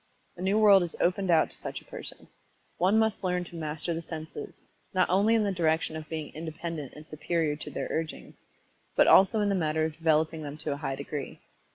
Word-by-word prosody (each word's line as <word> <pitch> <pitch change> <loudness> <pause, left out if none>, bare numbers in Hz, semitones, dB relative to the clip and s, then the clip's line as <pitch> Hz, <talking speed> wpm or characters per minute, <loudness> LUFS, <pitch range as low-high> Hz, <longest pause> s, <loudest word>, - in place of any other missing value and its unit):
_ - - -40 0.3
A 180 - -10
new 195 +3 +2
world 205 -3 +7
is 175 -2 -3
opened 185 +2 +1
out 165 -2 +4
to - - -10
such - - -6
a - - -21
person. - - -8 0.5
One 190 +5 +4
must 220 -2 +1
learn 180 -1 0
to 175 - -12
master 155 +1 -3
the 165 - -3
senses, 155 -2 -8 0.3
not 185 - +4
only 205 +5 +4
in 220 - +3
the 200 - +1
direction 160 -3 +1
of 155 -1 -7
being 155 -2 -5
independent 160 -2 -6
of - - -13
and 155 +1 -12
superior 155 0 -1
to - - -6
their - - -4
urgings, 160 -1 -4 0.6
but - - +6
also 205 +3 +6
in 205 - +2
the - - +2
matter 155 -3 +1
of 160 - -3
developing 160 0 +1
them 145 0 -6
to 155 -1 -3
a 140 - -2
high 135 -2 -3
degree. 140 0 -6
165 Hz, 225 wpm, -28 LUFS, 155-185 Hz, 0.6 s, world